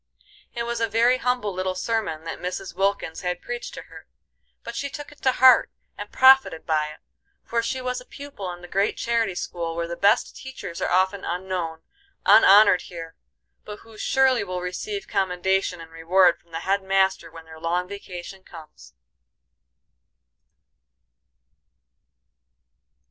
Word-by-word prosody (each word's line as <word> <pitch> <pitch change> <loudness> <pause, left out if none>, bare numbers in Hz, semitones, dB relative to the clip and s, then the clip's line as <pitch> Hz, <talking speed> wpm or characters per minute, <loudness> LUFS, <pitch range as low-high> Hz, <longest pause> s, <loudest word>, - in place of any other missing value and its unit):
It 235 - -2
was 235 0 -3
a 230 - +2
very 235 +4 +3
humble 245 -5 -1
little 185 0 -2
sermon 195 -6 -2
that 165 - -6
Mrs. 180 +1 -5
Wilkins 195 -3 -1
had 180 0 -2
preached 240 +3 -6
to - - -8
her, - - -14 0.6
but 235 - -7
she 280 +4 -3
took 290 +1 -9
it 295 - -18
to 260 - +2
heart 255 -2 +6 0.3
and 205 0 -8
profited 260 -11 +5
by 155 -2 +1
it; 155 - -12 0.4
for 230 0 -1
she 260 +3 -3
was 250 0 -3
a - - -15
pupil 275 -10 -8
in 175 0 -10
the - - -9
great 195 +3 0
charity 230 -5 0
school 170 -2 -4
where 170 0 -2
the 170 - -5
best 200 +4 +2
teachers 265 -10 -8
are - - 0
often 190 +2 +1
unknown, 175 -2 -4 0.4
unhonored 205 -2 +7
here, 165 -2 -9 0.5
but 210 0 -9
who 225 -1 -16
surely 265 +3 +2
will 185 -2 -4
receive 400 - -5
commendation 190 -1 0
and 165 0 -11
reward 175 +2 +3
from 170 - -32
the 165 0 -5
head 195 +1 0
master 190 -2 +1
when 165 0 -13
their 160 0 -13
long 175 +2 -1
vacation 190 -1 -9
comes. 155 - -14
190 Hz, 155 wpm, -24 LUFS, 175-230 Hz, 0.6 s, unhonored